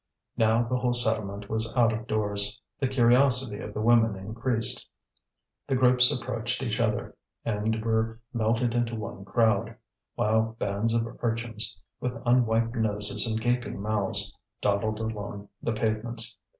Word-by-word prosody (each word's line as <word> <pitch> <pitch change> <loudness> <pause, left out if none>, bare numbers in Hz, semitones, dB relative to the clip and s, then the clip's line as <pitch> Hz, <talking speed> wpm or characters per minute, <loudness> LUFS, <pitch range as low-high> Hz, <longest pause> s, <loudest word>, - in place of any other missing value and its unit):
Now 115 +1 +3
the 125 +2 -1
whole 125 -1 +1
settlement 110 -4 +3
was 110 +1 -1
out 115 -2 +4
of 110 +1 -5
doors. 105 -1 -1 0.2
The 135 - +1
curiosity 125 -2 +3
of 105 - -6
the - - -2
women 115 -2 +4
increased. 115 +4 -1 0.8
The 135 - +1
groups 125 -1 +5
approached 120 0 -2
each 115 -2 -1
other, 110 -3 -1 0.3
and 110 0 -1
were 115 0 0
melted 115 +1 +1
into 120 -1 0
one 105 -3 -6
crowd; 110 +3 +1 0.4
while 110 +1 +1
bands 105 +3 -1
of 115 -1 +1 0.2
urchins, 115 -5 -1 0.2
with 125 0 -3
unwiped 115 -1 +3
noses 105 -1 -1
and 110 -1 -1
gaping 120 -2 -1
mouths, 105 -1 0 0.2
dawdled 105 +1 0
along 105 -2 -5
the 115 - -1
pavements. 115 +1 -1
115 Hz, 140 wpm, -27 LUFS, 110-120 Hz, 0.8 s, groups